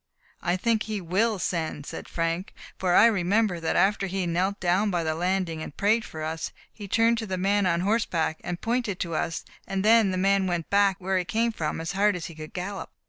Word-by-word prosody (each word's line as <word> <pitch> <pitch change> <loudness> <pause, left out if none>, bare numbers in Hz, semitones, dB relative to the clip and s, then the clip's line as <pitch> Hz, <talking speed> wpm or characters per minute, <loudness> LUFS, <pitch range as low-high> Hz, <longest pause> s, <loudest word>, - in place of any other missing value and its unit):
"I 175 +2 0
think 225 +2 +1
he 215 -2 -3
will 200 +5 +1
send," 160 -4 -2
said - - -7
Frank; 165 +2 -2 0.2
"for 180 -1 +2
I - - +8
remember 200 -2 +2
that 165 - -1
after 195 0 +2
he 190 0 -2
knelt 185 +4 0
down 185 +4 +2
by 175 -3 0
the 160 -1 0
landing 175 -1 -1
and 145 - -8
prayed 215 +3 +2
for 155 -1 -7
us, 160 +1 -3 0.2
he 205 -2 -8
turned 230 +3 +3
to 220 - -4
the 190 -1 -2
man 200 +1 +2
on 170 -1 +1
horse 220 +5 +1
back, 160 -2 -1
and 175 -1 -4
pointed 230 -5 -1
to 170 -2 -2
us; 165 +1 -2 0.2
and 195 +1 -2
then 225 -2 +6
the 185 - -1
man 195 0 +2
went 175 -3 -2
back 200 -1 +4
where 190 0 0
he - - -1
came 230 +5 0
from 160 -8 -3
as 165 +1 -3
hard 200 +1 +2
as 175 - -5
he 170 - -7
could 155 0 -9
gallop." 190 +2 -5
190 Hz, 230 wpm, -26 LUFS, 170-205 Hz, 0.2 s, I